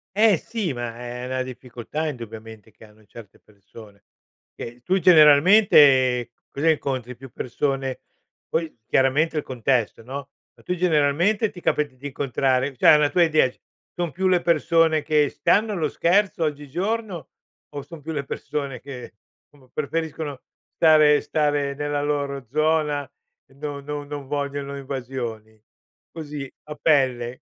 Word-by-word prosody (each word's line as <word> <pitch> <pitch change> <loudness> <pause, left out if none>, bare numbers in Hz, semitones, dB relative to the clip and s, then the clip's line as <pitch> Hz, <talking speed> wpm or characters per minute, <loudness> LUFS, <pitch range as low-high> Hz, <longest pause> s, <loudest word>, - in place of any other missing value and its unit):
Eh 215 -1 +5
sì 210 - -4
ma 120 -1 -5
è 125 0 -7
è - - -5
una 130 0 -2
difficoltà 130 +3 -6
indubbiamente 110 -3 -9
che - - -19
hanno 110 0 -19
certe 105 -1 -14
persone. 100 0 -17 0.5
Che 120 +1 -9
tu 190 +7 +1
generalmente 150 - +6 0.2
cosa 150 +4 +1
incontri? 130 -5 -1
Più 130 +1 -13
persone 135 +1 -3 0.5
poi 160 -5 -2
chiaramente 145 +6 +2
il 150 - -1
contesto 125 -2 -1
no, 140 +3 -7 0.3
ma - - -23
tu, 180 - -2
generalmente, 175 +5 +2
ti 180 -4 -12
capita 145 -3 0
di 135 +3 -8
incontrare 135 -1 0
cioè 125 - +6
una 150 -1 +3
tua 175 - +3
idea: 155 -5 +3 0.5
son 175 -3 -2
più 190 +6 -1
le 180 -2 +3
persone 165 -1 +2
che 150 -1 +2
stanno 215 +1 +1
allo 165 -7 -1
scherzo 185 +2 +1
oggigiorno 170 - -3 0.4
o 145 - -6
son 150 +3 -12
più 160 +3 -6
le 140 -2 -3
persone 135 -2 -5
che 130 -3 -9 0.4
somma 135 -3 -23
preferiscono 150 -1 -4 0.3
stare 155 -2 +5
stare 145 -2 0
nella 145 0 -2
loro 140 -2 -2
zona, 150 -1 0 0.4
no 145 0 -6
non 145 0 -6
non 145 -2 -7
vogliono 140 0 -3
invasioni? 125 -5 -6 0.5
Così 150 -4 -7
a 150 0 -8
pelle. 130 -6 +1
145 Hz, 140 wpm, -23 LUFS, 130-155 Hz, 0.5 s, generalmente